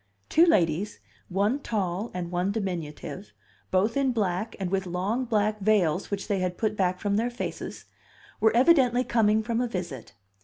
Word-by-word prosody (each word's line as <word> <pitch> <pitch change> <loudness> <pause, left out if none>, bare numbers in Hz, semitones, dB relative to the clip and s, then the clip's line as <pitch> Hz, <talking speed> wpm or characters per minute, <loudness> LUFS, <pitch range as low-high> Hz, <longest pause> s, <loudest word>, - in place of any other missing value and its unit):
Two 335 +2 +5
ladies, 185 - +1 0.3
one 205 +8 +1
tall 205 -3 -2
and 175 -1 -4
one 180 +2 0
diminutive, 175 -3 -5 0.4
both 200 +5 +1
in 275 -2 +2
black 210 -2 -1
and 185 -2 -3
with 190 -1 0
long 195 +9 -1
black 215 -2 +1
veils 195 -4 +2
which 200 -1 -3
they 200 -2 0
had 180 -1 -2
put 215 -1 0
back 185 -2 0
from 205 +1 0
their 235 +3 +1
faces, 240 0 -6 0.5
were 220 0 +3
evidently 255 -3 +5
coming 220 -3 +2
from 230 +1 -1
a 250 - 0
visit. 175 - -6
205 Hz, 165 wpm, -27 LUFS, 180-230 Hz, 0.5 s, Two